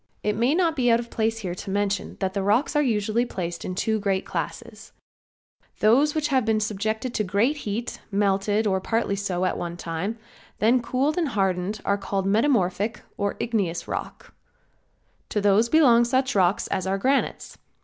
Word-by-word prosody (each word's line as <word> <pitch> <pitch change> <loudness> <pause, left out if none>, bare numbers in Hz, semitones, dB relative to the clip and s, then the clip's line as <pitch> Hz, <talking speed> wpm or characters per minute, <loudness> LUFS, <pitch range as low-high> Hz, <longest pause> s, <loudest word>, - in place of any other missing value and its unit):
It 210 0 0
may 245 +7 +2
not 335 -3 +2
be 250 -4 +2
out 230 0 +4
of 235 0 -7
place 225 0 0
here 175 - -2
to 190 +3 -7
mention 200 +1 -1
that 190 0 -1
rocks 205 +10 +1
are 295 - +4
usually 220 -3 +1
placed 175 -7 -5
in 185 - -4
two 220 +3 0
great 195 -2 -1
classes, - - -6 0.9
those 270 +8 +4
which 305 -1 0
have 260 -3 +2
been 220 0 +1
subject 215 +1 -2
to 215 - 0
great 210 +10 +1
heat, 230 -2 -4
melted, 205 +2 +1
or 190 -2 +1
partly 225 -1 0
so, 185 -2 -1
at - - -1
one 175 0 -5
time, 175 +7 -4 0.4
then 240 +4 +3
cooled 270 +7 0
and 330 - +1
hardened 195 -1 -1
are 200 0 +1
called 195 -1 -2
metamorphic 210 -1 +1
or 200 0 -2
igneous 200 -8 -1
rocks. - - -6 1.0
To 210 - 0
these 205 +3 +3
belong 250 -6 +5
such 260 +2 +1
rocks 190 -1 +2
as 185 - -2
our 195 +1 0
granites. 270 +7 -1
210 Hz, 175 wpm, -24 LUFS, 195-240 Hz, 1.0 s, belong